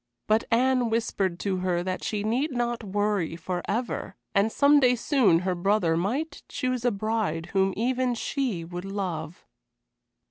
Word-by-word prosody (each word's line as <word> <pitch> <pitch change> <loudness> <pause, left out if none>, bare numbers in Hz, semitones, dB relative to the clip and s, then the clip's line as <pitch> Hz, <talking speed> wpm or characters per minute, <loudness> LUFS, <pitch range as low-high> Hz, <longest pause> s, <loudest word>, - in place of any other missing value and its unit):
But 215 +1 +2
Anne 250 0 +3
whispered 195 -5 -1
to 195 -2 -1
her 180 -1 0
that 185 0 -3
she 210 -2 -2
need 250 +8 0
not 240 -2 -1
worry 205 -4 0
forever, 185 +4 -3 0.2
and 200 +3 +3
some 285 +3 +5
day 250 -2 +4
soon 225 - +3
her 185 0 0
brother 180 -2 +2
might 265 - -2
choose 255 -3 -2
a 245 - +4
bride 200 -6 -2
whom 195 0 +3
even 250 +2 +1
she 230 -8 -2
would 175 +1 -6
love. 185 -4 -4
210 Hz, 150 wpm, -26 LUFS, 185-245 Hz, 0.2 s, some